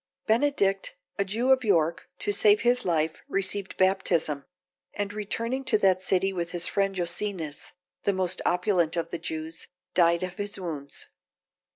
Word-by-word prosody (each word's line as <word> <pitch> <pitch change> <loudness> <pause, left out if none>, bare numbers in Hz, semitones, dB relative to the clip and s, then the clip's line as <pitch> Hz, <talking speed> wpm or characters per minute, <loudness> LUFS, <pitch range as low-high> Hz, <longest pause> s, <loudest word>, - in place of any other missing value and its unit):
Benedict, 230 - +1 0.2
a - - +4
Jew 230 +7 +1
of 260 -1 +4
York, 170 -6 +1
to 205 - -1
save 210 +1 +5
his 245 +1 +2
life, 160 -2 0
received 195 0 -2
baptism; 175 -6 +1 0.5
and 205 0 -2
returning 230 +5 -2
to 240 -5 +4
that 190 -3 +3
city, 190 +1 +1
with 175 -1 -3
his 175 0 +1
friend 195 0 0
Jocenus, 175 -3 -3 0.3
the 200 - +2
most 185 -1 0
opulent 180 -2 +1
of 170 - -2
the 170 - -3
Jews, 160 0 -5 0.3
died 170 0 +4
of 180 -1 -5
his 205 -1 -3
wounds. 150 -6 -6
190 Hz, 155 wpm, -27 LUFS, 170-205 Hz, 0.5 s, save